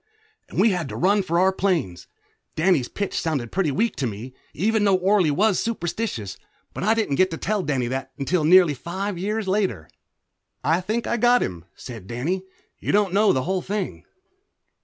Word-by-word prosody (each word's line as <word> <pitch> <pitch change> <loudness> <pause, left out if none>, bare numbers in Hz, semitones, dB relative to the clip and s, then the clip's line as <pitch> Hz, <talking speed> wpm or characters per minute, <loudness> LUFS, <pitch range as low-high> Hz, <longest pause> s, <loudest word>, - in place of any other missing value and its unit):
And - - -4
we 225 - +5
had 175 -3 -2
to - - -6
run 200 +3 +3
for 170 -3 -1
our 190 +1 +4
planes. 160 - -1 0.5
Danny's 160 -6 +2
pitch 200 -1 -3
sounded 140 -9 -2
pretty 185 -5 +1
weak 220 +11 0
to 135 - -1
me, 115 +4 -7 0.2
even 215 +5 +1
though 200 -2 +4
Orley 185 -2 +3
was 195 +7 +2
superstitious, 175 - -3 0.4
but - - -5
I 220 +3 +3
didn't 210 -12 0
get 185 0 +4
to 165 - -5
tell 210 +5 -1
Danny 135 -7 -1
that 135 0 -4
until 155 +4 0
nearly 175 -1 +6
five 180 +6 -4
years 210 +2 -2
later. 190 - 0 0.8
"I 165 +3 +2
think 220 +5 -2
I 235 - 0
got 245 +2 +4
him," 85 -2 -5
said 115 -7 -9
Danny. 145 - -2 0.4
"You - - -2
don't 200 -3 +2
know 205 0 +4
the 130 - 0
whole 185 +3 -1
thing." 200 +1 -4
185 Hz, 185 wpm, -23 LUFS, 140-205 Hz, 0.8 s, nearly